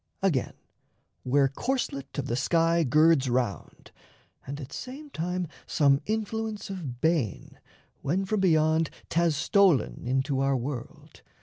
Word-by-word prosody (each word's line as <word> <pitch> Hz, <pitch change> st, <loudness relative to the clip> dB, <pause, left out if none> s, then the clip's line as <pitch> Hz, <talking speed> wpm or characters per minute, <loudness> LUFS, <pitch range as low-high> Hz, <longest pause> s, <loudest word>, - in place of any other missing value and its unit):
Again, 160 Hz, -10 st, +1 dB, 0.7 s
where 135 Hz, +2 st, +3 dB
corselet 140 Hz, -, -3 dB
of 140 Hz, -, -1 dB
the 120 Hz, -, -1 dB
sky 165 Hz, +5 st, +2 dB
girds 155 Hz, 0 st, +4 dB
round 120 Hz, -4 st, -3 dB, 0.6 s
And 140 Hz, +2 st, -5 dB
at 135 Hz, -3 st, -8 dB
same 280 Hz, +4 st, -8 dB
time, 180 Hz, 0 st, -2 dB, 0.2 s
some 140 Hz, -2 st, +3 dB
Influence 220 Hz, -1 st, -3 dB
of 145 Hz, -11 st, -6 dB
bane, 160 Hz, -, -1 dB, 0.4 s
When 185 Hz, +7 st, 0 dB
from 215 Hz, +2 st, 0 dB
Beyond 160 Hz, -3 st, +3 dB, 0.2 s
'thas 170 Hz, -2 st, +2 dB
stolen 185 Hz, -1 st, +3 dB
into 135 Hz, +2 st, 0 dB
[our 135 Hz, 0 st, +2 dB
world]. 125 Hz, 0 st, -7 dB
155 Hz, 125 wpm, -27 LUFS, 135-185 Hz, 0.7 s, girds